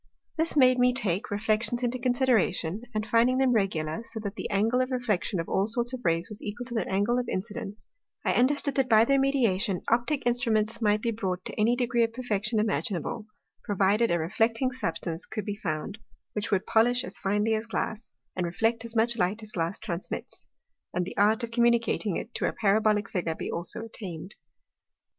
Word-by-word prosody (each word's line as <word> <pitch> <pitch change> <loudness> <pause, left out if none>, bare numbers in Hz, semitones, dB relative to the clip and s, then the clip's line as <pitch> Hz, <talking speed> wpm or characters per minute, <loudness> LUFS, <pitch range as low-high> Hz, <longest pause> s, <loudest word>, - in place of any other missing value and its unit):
This 320 -1 0
made 255 -2 +6
me 250 0 +4
take 200 -6 -1
Reflections 215 +3 0
into 245 +1 -1
Consideration, 235 -7 +1
and 215 0 0
finding 235 +3 +3
them 265 -1 +3
regular, 165 -6 0
so 230 -1 -5
that 200 -2 -5
the - - -4
Angle 225 +6 +2
of 255 - -1
Reflection 225 -7 -1
of 165 - -3
all 195 +2 +1
sorts 240 +2 -1
of 255 - -4
Rays 165 0 +1
was 215 - -8
equal 225 +4 -5
to 240 - -7
their 225 - -1
Angle 205 +6 +2
of 245 - -3
Incidence; 205 +1 -5 0.4
I - - +3
understood, 280 +3 +2
that 265 -2 +2
by 220 0 +6
their 275 +2 +3
mediation, 230 -9 +1
Optick 245 +5 +1
Instruments 230 -2 +1
might 210 -1 +2
be 235 - +1
brought 190 -5 -3
to - - -3
any 225 +3 +2
degree 240 -1 +2
of 225 0 -1
Perfection 220 -3 -1
imaginable, 210 0 -1 0.4
provided 205 +3 +2
a 170 - +2
Reflecting 225 +9 +1
Substance 170 -8 -3
could 215 - -4
be 205 - -3
found, 190 +2 -4 0.3
which 210 +1 -3
would 190 -2 +1
polish 245 +3 +3
as - - -7
finely 210 +3 +1
as 220 +1 -2
Glass, 220 -1 -3 0.2
and 185 - -1
reflect 225 +6 0
as 230 0 -8
much 230 +1 +2
Light 195 +5 0
as 215 - -7
Glass 170 0 -1
transmits; 170 +1 -6 0.5
and 180 0 +1
the - - -7
art 215 +4 +3
of 230 - -4
communicating 235 -4 +2
to - - 0
it 230 - -3
a - - -6
Parabolick 210 0 +2
Figure 170 -4 -2
be - - -5
also 175 +6 -4
attain'd. 190 -5 -4
220 Hz, 195 wpm, -28 LUFS, 195-240 Hz, 0.5 s, made